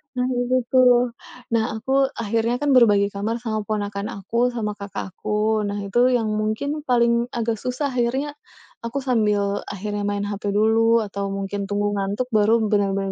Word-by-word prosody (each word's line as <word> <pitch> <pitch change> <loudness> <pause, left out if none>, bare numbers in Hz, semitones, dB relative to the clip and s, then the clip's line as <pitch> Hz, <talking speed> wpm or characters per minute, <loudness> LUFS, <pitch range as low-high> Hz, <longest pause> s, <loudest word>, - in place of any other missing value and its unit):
Nah 250 0 0
itu 245 +1 +1 0.2
tuh. 255 -1 +6 0.6
Nah, 225 - +3 0.2
aku 250 +4 -5 0.3
akhirnya 230 +2 0
kan 290 - +1
berbagi 205 -5 +5
kamar 210 +3 -1
sama 220 -2 -2
ponakan 205 -1 -3
aku, 195 +4 -9 0.2
sama 225 -3 -2
kakak 200 -2 -6
aku. 215 0 0
Nah 205 0 -3
itu 200 +5 0
yang 235 -3 +1
mungkin 280 +8 -2
paling 235 -2 +2
agak 230 -1 -1
susah. 250 +3 -1
Akhirnya 265 +5 -1 0.5
aku 235 +3 -4
sambil 210 -4 +1
akhirnya 205 +1 -4
main 205 0 -1
HP 205 0 -5
dulu 225 +2 +3
atau 200 -1 -4
mungkin 195 +1 -3
tunggu 205 +1 -1
ngantuk, 200 +5 -2
baru 215 +2 +4
benar-benar 195 -1 +1
215 Hz, 160 wpm, -22 LUFS, 205-235 Hz, 0.6 s, tuh